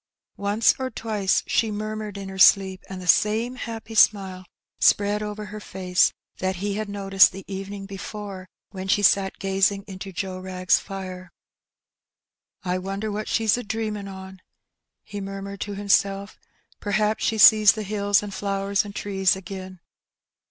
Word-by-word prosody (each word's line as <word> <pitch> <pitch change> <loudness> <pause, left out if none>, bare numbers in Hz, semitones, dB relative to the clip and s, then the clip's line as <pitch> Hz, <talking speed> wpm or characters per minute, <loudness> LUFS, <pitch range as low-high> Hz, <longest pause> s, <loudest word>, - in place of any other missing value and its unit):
Once 205 +3 +3
or 260 0 -2
twice 215 -5 0
she 225 - +1
murmured 215 -1 -5
in 195 -1 -6
her 190 0 -8
sleep, 190 0 +5
and 190 -1 -6
the 180 - -8
same 215 +7 +2
happy 225 -3 -7
smile 190 -4 +3 0.3
spread 205 +1 +3
over 210 0 -5
her 210 +2 -8
face 185 -3 +1 0.3
that 185 0 -1
he 200 +2 -3
had 215 0 -4
noticed 195 -1 +4
the 195 - -10
evening 195 0 -6
before 195 -1 -7 0.2
when 190 -1 -6
she 205 +1 +2
sat 195 0 +3
gazing 195 +1 +1
into 195 0 -8
Joe 185 0 -4
Wrag's 185 -1 +1
fire. 185 -2 -8 1.4
'^I 180 0 -1
wonder 195 +3 -4
what 210 +1 -4
she^s 225 +1 +1
a - - -5
dreamin' 210 -1 -4
on?'' 190 -1 -10 0.6
he 205 -1 -7
murmured 195 0 -7
to 205 -1 -4
himself. 200 0 0 0.4
''Perhaps 210 +1 0
she 220 - +1
sees 215 -1 +8
the 215 - -5
hills 205 0 +1
and 205 -1 -6
flowers 195 +1 -1
and 205 -1 -10
trees 195 -2 +1
agin.'' 185 -1 -9
200 Hz, 155 wpm, -24 LUFS, 190-210 Hz, 1.4 s, sees